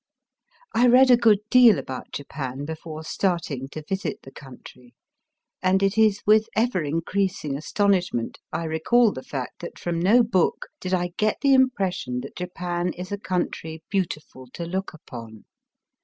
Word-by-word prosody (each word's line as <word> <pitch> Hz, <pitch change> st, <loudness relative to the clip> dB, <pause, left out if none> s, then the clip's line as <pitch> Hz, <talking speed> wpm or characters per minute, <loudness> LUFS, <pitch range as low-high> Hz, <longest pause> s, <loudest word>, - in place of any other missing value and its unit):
I 245 Hz, +2 st, +4 dB
read 255 Hz, +2 st, +6 dB
a -, -, +9 dB
good 225 Hz, -4 st, +4 dB
deal 245 Hz, -6 st, +7 dB
about 130 Hz, -1 st, -6 dB
Japan 140 Hz, -1 st, -5 dB
before 160 Hz, 0 st, -7 dB
starting 160 Hz, -7 st, -2 dB
to 155 Hz, +1 st, -8 dB
visit 195 Hz, 0 st, -3 dB
the 135 Hz, -, -12 dB
country, 125 Hz, -2 st, -14 dB, 0.7 s
and 190 Hz, +1 st, +2 dB
it 195 Hz, 0 st, +2 dB
is 215 Hz, -2 st, +3 dB
with 215 Hz, +1 st, +4 dB
ever 225 Hz, -5 st, +1 dB
increasing 165 Hz, 0 st, -1 dB
astonishment 180 Hz, -, 0 dB
I -, -, -2 dB
recall 185 Hz, +9 st, +3 dB
the 130 Hz, -, -7 dB
fact 130 Hz, -2 st, -6 dB
that 170 Hz, -, -8 dB
from 170 Hz, -1 st, -2 dB
no 215 Hz, +8 st, +5 dB
book 190 Hz, -6 st, 0 dB
did 185 Hz, -, -5 dB
I 175 Hz, -1 st, -2 dB
get 215 Hz, 0 st, +1 dB
the 275 Hz, -1 st, +4 dB
impression 190 Hz, -, +1 dB
that 135 Hz, -, -10 dB
Japan 180 Hz, -1 st, -3 dB
is 185 Hz, +2 st, -8 dB
a 205 Hz, -, -3 dB
country 165 Hz, -4 st, -3 dB
beautiful 155 Hz, -9 st, -3 dB
to 170 Hz, -, -5 dB
look 190 Hz, +3 st, -3 dB
upon. 115 Hz, -, -11 dB
180 Hz, 155 wpm, -24 LUFS, 150-205 Hz, 0.7 s, a